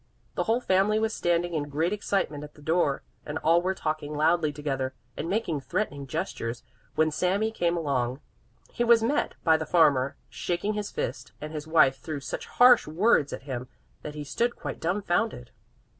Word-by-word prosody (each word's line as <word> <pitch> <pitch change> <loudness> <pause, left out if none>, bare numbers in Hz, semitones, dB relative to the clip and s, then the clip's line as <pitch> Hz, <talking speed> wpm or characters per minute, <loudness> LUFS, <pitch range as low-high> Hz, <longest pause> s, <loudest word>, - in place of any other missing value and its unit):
The - - -1
whole 230 +3 +2
family 195 +1 +3
was 220 0 0
standing 175 0 0
in 145 -2 -2
great 160 +6 0
excitement 195 -8 -1
at 150 - -11
the 150 - -16
door 160 -3 +1 0.2
and 150 +1 -4
all 165 +2 +3
were 190 +1 -1
talking 155 -2 -3
loudly 155 +1 +2
together 135 -3 -3 0.2
and 165 - -4
making 180 -8 -1
threatening 145 -5 -3
gestures, 115 -1 -4 0.3
when 155 0 +3
Sami 195 +7 +1
came 175 -5 0
along. 135 -5 -1 0.5
He 240 - -1
was 235 -1 +5
met 280 +6 0
by 160 -2 +5
the 160 - -3
farmer, 145 -5 +3
shaking 180 +4 -2
his 210 -1 -3
fist, - - -4
and 155 +1 -7
his 155 0 -5
wife 135 -5 +4
threw 150 +4 -5
such 135 - -5
harsh 245 -5 +6
words 160 -2 +3
at - - -6
him 130 -3 -5 0.3
that 150 - -7
he 150 - -5
stood 235 +11 -1
quite - - -6
dumfounded. 175 - -1
160 Hz, 180 wpm, -27 LUFS, 145-195 Hz, 0.5 s, harsh